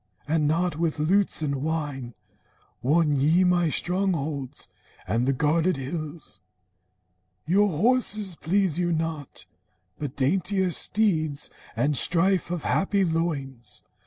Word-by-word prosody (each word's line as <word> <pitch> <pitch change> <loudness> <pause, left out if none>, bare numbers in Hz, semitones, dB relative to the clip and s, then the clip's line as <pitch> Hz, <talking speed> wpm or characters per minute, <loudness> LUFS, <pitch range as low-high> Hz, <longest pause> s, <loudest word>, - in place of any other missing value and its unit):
And 155 -1 +1
not 170 +1 0
with 165 -1 -1
lutes 180 +2 +2
and 140 -2 -1
wine 145 -6 -3 0.7
Won 150 +2 +2
ye 160 +7 +4
my 175 -2 +3
strongholds 160 -7 -2 0.4
and 120 +3 0
the - - +4
guarded 155 +5 +1
hills. 145 - -6 1.0
Your 200 +6 +3
horses 210 +1 +1
please 180 0 0
you 175 -1 +1
not, 160 -3 -4 0.5
but 145 -3 -5
daintier 185 +6 +1
steeds, 155 -8 0 0.2
And 145 +1 +1
strife 175 +6 +2
of 175 -3 -3
happy 195 0 +1
loins. 145 -7 -3
160 Hz, 115 wpm, -25 LUFS, 145-180 Hz, 1.0 s, ye